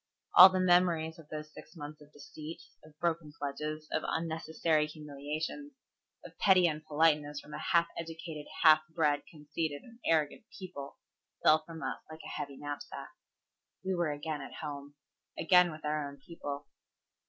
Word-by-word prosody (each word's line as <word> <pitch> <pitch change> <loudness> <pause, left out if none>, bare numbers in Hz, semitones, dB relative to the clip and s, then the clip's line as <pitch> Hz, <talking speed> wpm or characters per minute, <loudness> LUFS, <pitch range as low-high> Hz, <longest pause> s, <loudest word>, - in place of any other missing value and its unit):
All 185 +1 +12
the 185 0 0
memories 175 -3 +3
of 155 -2 -14
those 155 0 -7
six - - -13
months 150 -1 -8
of 150 0 -16
deceit, 155 +3 -9 0.2
of 155 -1 -17
broken 165 -2 -1
pledges, 150 +2 -4
of 155 - +1
unnecessary 160 -1 0
humiliations, 150 - -5 0.5
of - - -11
petty 185 -3 +6
unpoliteness 150 -1 +1
from 150 +1 -12
a 150 - -4
half 170 +2 +3
educated, 165 -2 -6 0.2
half 155 -1 +9
bred, 150 -3 +2
conceited, 150 -1 -4
and 235 -1 -16
arrogant 160 +5 +1
people 180 -8 -8 0.5
fell 155 0 +6
from 165 -1 -8
us - - -3
like 160 0 -9
a - - -7
heavy 140 -1 -5
knapsack. 145 0 -6 0.7
We 190 - +1
were 175 -3 +1
again 145 0 -4
at 135 - -9
home. 145 -1 -6 0.4
Again 180 -2 +5
with 155 0 -9
our 150 -1 -1
own 140 - -12
people. 145 -1 -7
155 Hz, 155 wpm, -32 LUFS, 150-165 Hz, 0.7 s, All